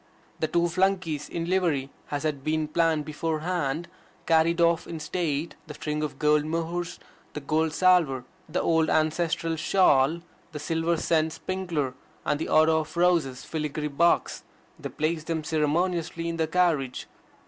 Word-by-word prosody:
The 160 - +1
two 170 +2 +2
flunkeys 180 -4 0
in 165 -1 -3
livery, 165 -7 0 0.2
as 145 0 -3
had 145 -3 -2
been 155 0 0
planned 160 -1 +1
beforehand, 160 0 -2 0.4
carried 165 +1 +3
off 170 -1 +3
in 165 - -6
state 155 -1 -2
the 150 - -8
string 150 +1 -3
of 150 - -3
gold 150 0 +3
mohurs, 165 +2 -3 0.3
the - - -4
gold 155 +2 0
salver, 165 -7 +3 0.3
the 170 - -1
old 160 -1 +2
ancestral 165 +1 +1
shawl, 155 -3 +3 0.3
the 150 - -5
silver 165 +2 0
scent 160 -1 +1
sprinkler, 175 -8 -3 0.3
and 145 - 0
the - - -2
otto 160 0 +4
of 155 +2 -6
roses 170 -8 +2
filigree 150 -1 -3
box; 170 +4 +2 0.4
they - - -5
placed 155 0 -2
them 160 -2 -1
ceremoniously 165 +2 0
in 165 0 -3
the 160 -1 +1
carriage. 160 -7 +1
160 Hz, 150 wpm, -26 LUFS, 150-170 Hz, 0.4 s, otto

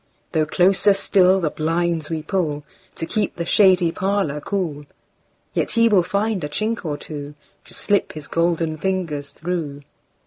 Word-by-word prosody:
Though 155 -3 +1
closer 195 +4 +4
still 190 -1 +4
the 160 -5 -1
blinds 165 0 -1
we 160 -2 -3
pullTo 155 -5 -1 0.4
keep 210 +3 -1
the 170 - -3
shady 185 -3 +4
parlour 190 -6 -1
cool, 155 -6 -3 0.7
Yet - - 0
he 230 0 +6
will 200 -4 +5
find 200 +1 -1
a 145 - -3
chink 215 +9 -2
or 150 -4 -3
twoTo 145 -1 -8 0.3
slip 205 -2 0
his 150 -2 -8
golden 165 -1 0
fingers 165 -7 -2
through. 150 -2 -4
170 Hz, 145 wpm, -21 LUFS, 150-195 Hz, 0.7 s, he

